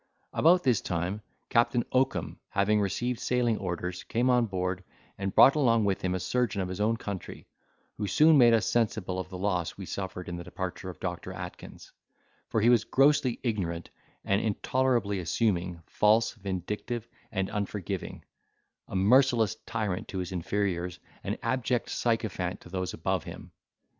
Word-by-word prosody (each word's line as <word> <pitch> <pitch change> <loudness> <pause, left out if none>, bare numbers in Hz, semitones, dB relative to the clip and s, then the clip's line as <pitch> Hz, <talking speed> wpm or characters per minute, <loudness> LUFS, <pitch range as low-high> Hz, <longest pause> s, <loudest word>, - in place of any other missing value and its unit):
About 175 +3 +5
this 125 -6 +3
time, 90 +4 -2 0.3
Captain 120 0 +2
Oakum, 130 +1 0
having 105 +2 +2
received 120 +5 -1
sailing 120 -3 +1
orders, 90 0 -3
came 125 +3 +1
on 120 -2 +3
board, 95 -1 -2 0.3
and 95 0 -4
brought 135 - +8
along 115 -7 +3
with 100 -1 0
him 95 0 0
a - - -1
surgeon 120 -1 0
of 95 -1 -2
his 95 +2 -4
own 115 +2 +2
country, 100 -5 -6 0.5
who 105 - -2
soon 155 - +5
made 120 -4 +7
us 110 - +1
sensible 105 -5 0
of 95 0 -5
the 95 - -7
loss 90 -3 -1
we 95 - -6
suffered 95 -1 -5
in 85 0 -4
the 85 - -6
departure 95 +1 -5
of 90 - -9
Doctor 90 0 -4
Atkins; 90 -1 -9 0.6
for 110 - +1
he 115 - +5
was 120 -3 +5
grossly 135 +1 +3
ignorant, 90 -8 -2 0.3
and 100 +1 +2
intolerably 115 -2 0
assuming, 90 -2 -1
false, 110 +5 +3
vindictive, 105 +3 -4 0.2
and 95 0 -1
unforgiving; 100 -2 -4 0.6
a - - -7
merciless 115 +2 +4
tyrant 105 -5 -2
to 95 - -6
his 90 -1 -3
inferiors, 90 -1 -2 0.3
an - - -2
abject 125 0 0
sycophant 110 -6 -1
to - - -13
those 90 -1 -3
above - - -1
him. - - -9
100 Hz, 160 wpm, -29 LUFS, 90-115 Hz, 0.6 s, brought